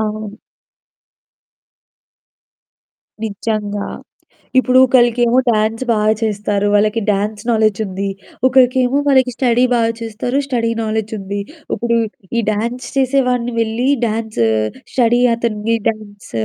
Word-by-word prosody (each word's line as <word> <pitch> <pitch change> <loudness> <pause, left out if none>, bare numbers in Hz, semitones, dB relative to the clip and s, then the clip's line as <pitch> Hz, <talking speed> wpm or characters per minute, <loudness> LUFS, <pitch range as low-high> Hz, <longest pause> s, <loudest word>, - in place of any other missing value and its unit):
అవును. 215 -1 -4 2.9
నిజంగా. 205 -1 -3 0.7
ఇప్పుడు 255 0 +4
ఒకళ్ళకేమో 240 -1 +3
డాన్స్ 220 +3 0
బాగా 215 0 +2
చేస్తారు. 205 -2 -1
వాళ్ళకి 215 +2 +2
డాన్స్ 210 +2 -2
నాలెడ్జుంది. 210 -3 0 0.4
ఒకరికేమో 255 +1 +3
వాళ్ళకి 260 -2 +3
స్టడీ 245 -1 +2
బాగా 230 -1 +2
చేస్తారు, 230 +4 -3
స్టడీ 235 -4 -1
నాలెడ్జుంది. 215 -2 -3 0.3
ఇప్పుడు 235 -1 0 0.4
ఈ - - +4
డాన్స్ 235 +4 -3
చేసేవాడిని 250 -3 +1
వెళ్లి 230 +3 0 0.2
డాన్సు, 220 - -1 0.5
స్టడీ 240 -1 +3
అతన్ని 230 -1 -1
డాన్సు 205 - -7
225 Hz, 95 wpm, -17 LUFS, 210-245 Hz, 2.9 s, ఇప్పుడు